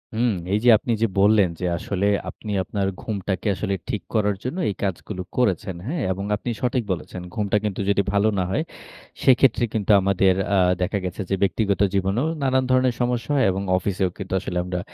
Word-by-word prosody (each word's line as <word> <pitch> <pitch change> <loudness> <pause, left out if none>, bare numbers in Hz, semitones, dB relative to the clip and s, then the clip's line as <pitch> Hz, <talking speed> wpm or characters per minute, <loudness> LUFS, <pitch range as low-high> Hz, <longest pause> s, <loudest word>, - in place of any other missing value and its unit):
হুম। 120 0 +2 0.2
এই 105 - +3
যে 125 - +5
আপনি 120 - -4
যে 115 - +4
বললেন 100 -2 +5
যে 90 - -2
আসলে 100 +3 -1 0.2
আপনি 105 - -8
আপনার 100 +1 -2
ঘুমটাকে 100 -1 -3
আসলে 100 0 -2 0.2
ঠিক 105 -5 -2
করার 105 -2 +2
জন্য 130 +9 -4
এই 100 - -3
কাজগুলো 95 0 -3 0.2
করেছেন। 95 -6 +1
হ্যা? 170 - -2
এবং 100 +2 -3
আপনি 120 - -5
সঠিক 125 -1 0
বলেছেন 90 0 -5
ঘুমটা 105 -1 0
কিন্তু 100 -1 -2
যদি 100 - +3
ভালো 100 +2 +3
না - - +2
হয় 155 - 0 0.6
সেক্ষেত্রে 130 -2 +4
কিন্তু 105 -1 +1
আমাদের 95 -1 +3 0.2
আ - - +3 0.2
দেখা 100 +3 0
গেছে 90 +3 -4
যে 95 - +2
ব্যক্তিগত 100 0 +1
জীবনেও 100 +9 +1
নানান 130 -1 +2
ধরনের 130 -1 +3
সমস্যা 120 +3 -1
হয় 135 - +3
এবং 95 +1 -3 0.2
অফিসেও 95 0 -1
কিন্তু 95 -1 -6
আসলে 90 -2 -4
আমরা 90 0 -3
100 Hz, 190 wpm, -23 LUFS, 95-120 Hz, 0.6 s, যে